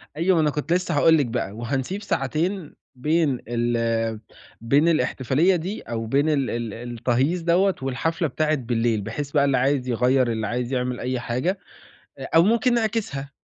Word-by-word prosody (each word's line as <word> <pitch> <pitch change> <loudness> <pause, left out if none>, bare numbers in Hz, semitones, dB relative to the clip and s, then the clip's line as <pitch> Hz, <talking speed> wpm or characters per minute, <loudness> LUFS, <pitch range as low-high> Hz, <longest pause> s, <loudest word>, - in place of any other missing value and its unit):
أيوة 175 +3 +2
ما 160 - +3
أنا 150 - +2
كنت 150 +3 -2
لسه 175 -3 0
هاقول 160 +2 +5
لِك 145 - +2
بقى، 115 -5 -3
وهنسيب 130 - -3
ساعتين 160 +4 -2 0.2
بين 150 -1 +1
ال 115 -2 -1 0.4
بين 140 +8 +3
الاحتفالية 155 +2 +2
دي 180 +5 -4
أو 115 -1 -4
بين 140 +7 +1
ال 140 -4 +1
ال 115 -3 -3
التهييص 120 +7 -1
دَوّة 180 +3 +2
والحفلة 155 +5 -1
بتاعة 155 +3 0
بالليل، 115 -4 0
بحيث 140 +7 -5
بقى 140 -2 +3
اللي 135 -2 +2
عايز 130 0 +1
يغيّر 125 +1 +2
اللي 110 -1 -2
عايز 125 +3 -3
يعمل 125 0 -1
أي 125 0 -2
حاجة، 130 +11 -2 0.6
أ 135 - -8
أو 165 - +7
ممكن 235 +4 +2
نعكسها. 215 -12 -2
135 Hz, 170 wpm, -23 LUFS, 120-165 Hz, 0.6 s, أو